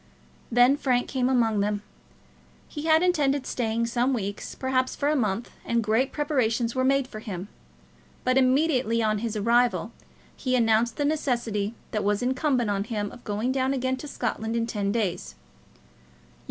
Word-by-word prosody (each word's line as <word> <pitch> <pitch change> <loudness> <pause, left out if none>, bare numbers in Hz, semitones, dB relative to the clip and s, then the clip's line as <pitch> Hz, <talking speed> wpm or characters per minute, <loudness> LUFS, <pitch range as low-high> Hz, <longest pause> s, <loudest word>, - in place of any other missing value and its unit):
Then 245 +4 +5
Frank 250 -3 +1
came 255 -2 0
among 230 -5 +2
them. 205 0 -1 0.8
He 300 0 -6
had 320 +1 +4
intended 285 -6 +2
staying 230 -1 -1
some 245 +3 +1
weeks, 205 -2 -5
perhaps 260 -1 0
for 285 - 0
a 305 - +2
month, 220 -3 -1
and 235 -1 0
great 225 +6 +1
preparations 250 -6 0
were 255 - 0
made 270 0 +2
for 215 - -8
him; 200 -2 -6 0.7
but 255 0 +2
immediately 260 -3 +2
on 215 -1 +1
his 225 0 -3
arrival 235 +1 +2 0.4
he 255 -2 -1
announced 230 0 +2
the 290 - 0
necessity 240 -8 -1 0.2
that 215 -2 -1
was 205 +3 +1
incumbent 255 -3 +1
on 200 0 -1
him 210 -3 -3
of 245 - -13
going 215 +5 -1
down 265 +1 0
again 260 0 0
to 295 - -8
Scotland 225 -4 -3
in 230 0 +1
ten 205 -3 -2
days. 185 - -2
240 Hz, 165 wpm, -26 LUFS, 220-260 Hz, 0.8 s, Then